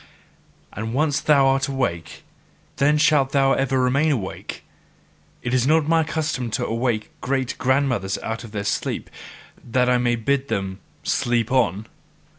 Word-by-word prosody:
And 110 +3 -4
once 145 -1 +1
thou 140 -2 +4
art 135 0 +2
awake, 125 - -3 0.5
then 150 +2 +3
shalt 145 -3 +3
thou 135 -1 +4
ever 135 0 +1
remain 140 +5 +2
awake. 105 -10 -4 0.8
It 120 - -2
is 130 0 +2
not 155 0 +3
MY 165 -1 +3
custom 155 -6 -2
to - - -2
awake 115 -1 -1
great 130 -1 -1
grandmothers 130 -7 +1
out 115 +1 -4
of 115 - -10
their 105 -1 -3
sleep 100 - -2 0.5
that 125 +1 +1
I 125 - +3
may 120 -1 +1
bid 135 +4 0
them 95 -5 -3 0.2
sleep 120 0 0
on! 110 -6 +1
130 Hz, 150 wpm, -22 LUFS, 115-140 Hz, 0.8 s, thou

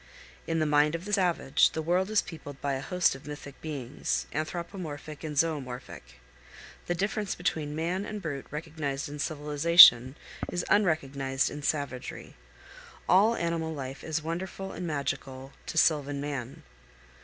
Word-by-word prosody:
In 165 - 0
the 155 - +2
mind 150 +1 +3
of 165 +2 -6
the 210 - -5
savage 175 -8 +3
the 160 - -2
world 180 +4 +1
is 215 -1 +2
peopled 145 -4 -9
by 140 -1 -1
a 135 - -2
host 180 +4 +2
of 135 +1 -11
mythic 145 -1 -9
beings, 140 -5 -3
anthropomorphic 155 -2 -5
and 155 -1 -4
zoomorphic. 130 - -3 0.7
The 175 - 0
difference 200 +2 -1
between 155 -4 -2
man 175 +5 -1
and 210 0 -5
brute 145 -7 -5
recognized 150 -2 -4
in 145 +1 -7
civilization, 150 -4 +7 0.4
is 175 0 -2
unrecognized 140 -8 +1
in 150 - -6
savagery. 140 -4 -3 0.7
All 205 +6 +5
animal 165 -3 -2
life 135 -1 -6
is 160 -1 -2
wonderful 185 +4 -4
and 180 - -5
magical 135 -3 -4
co - - -5
sylvan 145 -3 +2
man. 140 -3 -5
155 Hz, 145 wpm, -29 LUFS, 140-170 Hz, 0.7 s, civilization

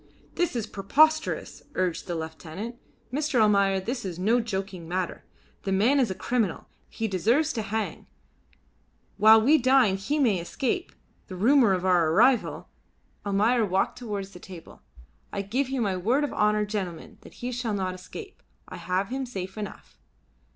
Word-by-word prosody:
"This 350 -6 -1
is 230 -3 -1
preposterous," 310 +10 +1
urged 185 -1 -1
the 175 - -3
lieutenant. 160 +7 -6 0.4
"Mr. 295 -2 0
Almayer, 200 -2 +4
this 240 +6 -4
is 180 -4 -5
no 220 +7 +2
joking 190 -5 -5
matter. 180 +1 -3 0.4
The 195 - -3
man 225 +9 +3
is 250 -5 +2
a 190 - -3
criminal. 225 -6 -1 0.2
He 225 - -3
deserves 235 - +1
to 225 - -2
hang. 215 +1 -4 1.1
While 220 +1 +7
we 300 +6 +5
dine 255 -6 +4
he 285 +10 -2
may 230 -10 +2
escape; 270 - -2 0.4
the 185 - -7
rumour 230 +2 +4
of 185 0 -1
our 175 -3 +3
arrival 235 +8 +3 0.3
" - - -38
Almayer 220 +4 +3
walked 195 +4 0
towards 205 -5 -5
the 180 - -12
table. 175 -2 -12 0.5
"I 200 - -3
give 255 +7 -1
you 265 -2 -1
my 200 -4 0
word 235 +11 +1
of 290 - -2
honour, 210 0 +2
gentlemen, 195 -5 -5
that - - -15
he 245 +1 -5
shall 240 -3 -2
not 185 -2 -2
escape; 385 - -10 0.3
I - - -8
have 185 +2 -1
him 265 +1 -3
safe 190 -5 -6
enough." 210 -2 -8
210 Hz, 165 wpm, -26 LUFS, 190-250 Hz, 1.1 s, While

